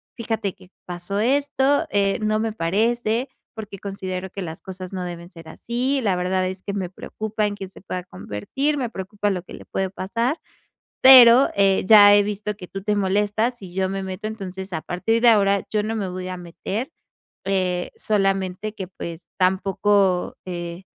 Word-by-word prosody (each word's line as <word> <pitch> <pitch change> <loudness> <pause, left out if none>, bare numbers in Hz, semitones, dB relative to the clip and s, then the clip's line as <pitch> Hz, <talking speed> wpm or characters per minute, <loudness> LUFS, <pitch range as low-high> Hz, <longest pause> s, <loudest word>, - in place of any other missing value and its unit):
fíjate 225 -4 -2
que 185 - -19
pasó 175 +3 -3
esto, 280 +3 +2
eh, 200 -1 +1
no 215 0 +1
me 220 0 -1
parece, 225 +6 0 0.3
porque 210 -3 -8
considero 190 -1 -5
que 200 - -6
las 160 -3 -6
cosas 185 0 -8
no 185 -1 -3
deben 175 -1 -7
ser 165 -3 -13
así. 250 +9 -1
La 200 -6 +1
verdad 185 +1 0
es 185 0 -6
que 200 - -4
me 190 -3 -3
preocupa 215 +3 -3
en 205 - -4
que 195 -1 -7
se 190 - -15
pueda 185 -2 -5
convertir, 180 - -3
me 250 -4 -2
preocupa 205 0 -3
lo 180 -3 -2
que - - -13
le - - -10
puede 190 -1 -2
pasar. 230 - -2 0.6
Pero, 255 0 +9
eh, 195 -1 +4
ya 205 -1 +9
he 205 - +5
visto 210 0 -3
que 180 -3 -10
tú 195 - -7
te 210 0 +1
molestas 205 +5 +1
si 190 -5 -11
yo 190 0 0
me 195 0 -3
meto. 190 +3 -5
Entonces, 190 -3 -7
a 160 - -2
partir 225 +6 0
de 240 - +7
ahora 200 -3 +4
yo 210 -1 +1
no 220 +2 -2
me 200 -3 -2
voy 185 0 -5
a 185 - -4
meter, 190 - -5 0.5
eh, 185 -2 0
solamente 195 0 0
que, 190 - -5
pues, 170 -2 -8
tampoco, 190 0 +2
eh, 175 0 -6
195 Hz, 185 wpm, -23 LUFS, 185-215 Hz, 0.6 s, Pero